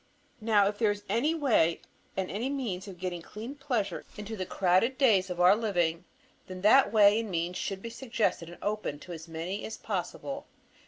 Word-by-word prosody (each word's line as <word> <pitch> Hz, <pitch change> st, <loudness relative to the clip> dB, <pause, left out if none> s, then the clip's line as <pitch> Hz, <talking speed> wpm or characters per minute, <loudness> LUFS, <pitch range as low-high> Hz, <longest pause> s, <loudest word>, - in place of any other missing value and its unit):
Now 215 Hz, -2 st, +4 dB
if 205 Hz, 0 st, -3 dB
there 220 Hz, -3 st, +3 dB
is 205 Hz, 0 st, -2 dB
any 245 Hz, +11 st, +1 dB
way 225 Hz, -, +3 dB, 0.4 s
and 190 Hz, -1 st, -2 dB
any 230 Hz, +7 st, -2 dB
means 220 Hz, -9 st, -3 dB
of 190 Hz, -3 st, -9 dB
getting 175 Hz, -1 st, -4 dB
clean 220 Hz, +9 st, -8 dB
pleasure 265 Hz, -8 st, -2 dB
into 210 Hz, +1 st, -5 dB
the 185 Hz, -3 st, -4 dB
crowded 195 Hz, +8 st, +2 dB
days 205 Hz, -9 st, +4 dB
of 180 Hz, -1 st, -4 dB
our 180 Hz, +3 st, +7 dB
living, 175 Hz, -7 st, 0 dB, 0.4 s
then 185 Hz, -1 st, -7 dB
that 215 Hz, +4 st, +6 dB
way 210 Hz, 0 st, +6 dB
and 225 Hz, -2 st, -4 dB
means 175 Hz, 0 st, -2 dB
should 195 Hz, -1 st, -4 dB
be 230 Hz, -, -5 dB
suggested 230 Hz, -8 st, -1 dB
and 175 Hz, -, -11 dB
opened 205 Hz, -8 st, -3 dB
to 180 Hz, -, -8 dB
as 160 Hz, 0 st, -9 dB
many 165 Hz, +5 st, -4 dB
as 220 Hz, -, -6 dB
possible. 275 Hz, -, -4 dB
205 Hz, 195 wpm, -29 LUFS, 180-230 Hz, 0.4 s, our